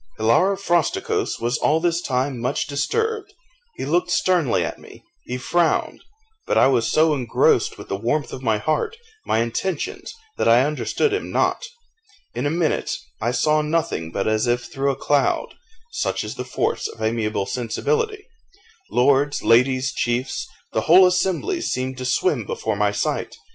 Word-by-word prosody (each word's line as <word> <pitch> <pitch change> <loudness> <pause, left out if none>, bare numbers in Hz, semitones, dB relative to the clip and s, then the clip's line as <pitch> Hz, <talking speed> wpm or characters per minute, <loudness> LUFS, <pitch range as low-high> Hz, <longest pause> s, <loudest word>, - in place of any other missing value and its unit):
Hilaro 150 - +3
Frosticos 175 -5 0
was 120 +2 -1
all 155 +2 +2
this 170 0 0
time 130 -2 -1
much 120 - -1
disturbed; 430 - -2 0.4
he - - -5
looked 175 +5 +1
sternly 175 -7 +2
at - - -6
me - - -15 0.2
he 125 - -4
frowned, 170 +6 0 0.4
but - - +1
I - - +6
was 120 -4 +2
so 155 0 +3
engrossed 125 -6 +2
with - - -10
the - - -1
warmth 120 +8 -1
of 130 - -6
my 110 -4 +1
heart, 295 - -1 0.3
my 115 - +2
intentions, 360 - -4 0.2
that - - +2
I 120 +2 +6
understood 150 - 0
him 420 - -3
not: - - +1 0.7
in 125 +4 -1
a - - +1
minute 165 0 0 0.3
I 115 - +1
saw 150 +5 +2
nothing 150 - -1
but 100 - -2
as 110 +2 +1
if 120 0 +1
through 135 +3 -2
a 135 - 0
cloud 145 0 0 0.4
(such - - -2
is - - -5
the - - -5
force - - -1
of - - -12
amiable 110 -2 -1
sensibility) 415 - -2 0.6
lords, 140 +3 +2
ladies, 130 +3 +3
chiefs 120 +2 -2 0.3
the - - +1
whole 185 +3 +8
assembly 190 - 0
seemed 130 - -3
to 130 - -4
swim 130 - 0
before 110 -1 -2
my 105 0 +1
sight. 105 - -2
135 Hz, 165 wpm, -22 LUFS, 120-175 Hz, 0.7 s, whole